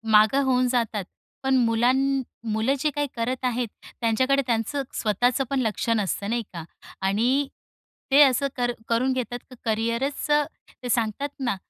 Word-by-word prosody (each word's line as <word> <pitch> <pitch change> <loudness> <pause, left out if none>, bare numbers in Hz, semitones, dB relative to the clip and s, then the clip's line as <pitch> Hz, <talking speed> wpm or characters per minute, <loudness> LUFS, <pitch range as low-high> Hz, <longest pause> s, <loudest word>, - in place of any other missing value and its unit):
मागं 215 +6 +5
होऊन 255 -1 +3
जातात. 230 -5 0 0.4
पण 265 0 +3
मुलांना 260 +4 +2 0.3
मुलं 220 +5 +1
जी 300 - +1
काही 290 0 0
करत 250 +2 -2
आहेत, 245 -1 0 0.3
त्यांच्याकडे 260 +5 +2
त्यांचं 235 +4 0
स्वतःचं 245 +5 +1
पण 275 - 0
लक्ष 220 -1 -1
नसतं 200 -1 -1
नाही 235 +1 0
का 170 -2 -6 0.4
आणि 245 +8 +2 0.6
ते 280 +2 +7
असं 275 0 +3
कर 245 -1 0 0.2
करून 250 +3 +2
घेतात, 245 -1 -3
की 255 - -12
करियरच 230 +5 -1 0.6
ते 245 - -4
सांगतात 235 +4 0
ना, 245 -5 0
245 Hz, 150 wpm, -25 LUFS, 225-265 Hz, 0.6 s, ते